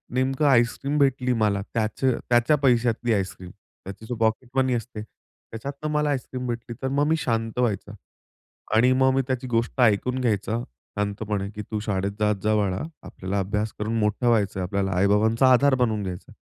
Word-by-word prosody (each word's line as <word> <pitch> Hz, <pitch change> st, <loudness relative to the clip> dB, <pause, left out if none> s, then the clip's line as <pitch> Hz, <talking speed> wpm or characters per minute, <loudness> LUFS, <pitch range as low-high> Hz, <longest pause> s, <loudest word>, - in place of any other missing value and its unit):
नेमकं 135 Hz, +3 st, +1 dB
आईस्क्रीम 135 Hz, +3 st, +2 dB
भेटली 130 Hz, -2 st, +2 dB
मला 100 Hz, -2 st, +2 dB
त्याच 110 Hz, +2 st, -2 dB
त्याच्या 120 Hz, +2 st, +2 dB
पैशातली 120 Hz, -3 st, +2 dB
आईस्क्रीम. 95 Hz, -2 st, -3 dB
त्याची 100 Hz, +4 st, -13 dB
जो 120 Hz, -, -4 dB
पॉकेटमनी 125 Hz, +3 st, 0 dB
असते, 115 Hz, -2 st, -4 dB
त्याच्यातनं 140 Hz, +7 st, -9 dB
मला 150 Hz, 0 st, +1 dB
आईस्क्रीम 130 Hz, -2 st, -3 dB
भेटली 120 Hz, 0 st, -5 dB
तर -, -, +1 dB
मग 145 Hz, +2 st, +1 dB
मी 160 Hz, -, +3 dB
शांत 115 Hz, -4 st, -2 dB
व्हायचा 105 Hz, -3 st, -1 dB, 0.8 s
आणि 125 Hz, +3 st, +5 dB
मग 130 Hz, 0 st, +3 dB
मी 135 Hz, -, +3 dB
त्याची 130 Hz, 0 st, -2 dB
गोष्ट 120 Hz, +2 st, 0 dB
ऐकून 125 Hz, +3 st, +2 dB
घ्यायचा 110 Hz, -1 st, 0 dB, 0.4 s
शांतपणे 100 Hz, -1 st, -2 dB
की 105 Hz, -, -4 dB
"तू 105 Hz, -, -1 dB
शाळेत 100 Hz, -2 st, -2 dB
जात 105 Hz, -1 st, +2 dB
जा 110 Hz, 0 st, +2 dB
बाळा. 100 Hz, -3 st, 0 dB, 0.2 s
आपल्याला 95 Hz, +2 st, -4 dB
अभ्यास 105 Hz, +3 st, -2 dB
करून 110 Hz, +2 st, -1 dB
मोठं 105 Hz, +3 st, 0 dB
व्हायचंय, 100 Hz, -5 st, +1 dB
आपल्याला 95 Hz, +1 st, -1 dB
आई-बाबांचा 110 Hz, +6 st, +3 dB
आधार 135 Hz, +1 st, +4 dB
बनवून 110 Hz, -4 st, +1 dB
घ्यायचा 90 Hz, -2 st, -6 dB
आहे." -, -, -17 dB
115 Hz, 165 wpm, -24 LUFS, 105-130 Hz, 0.8 s, आणि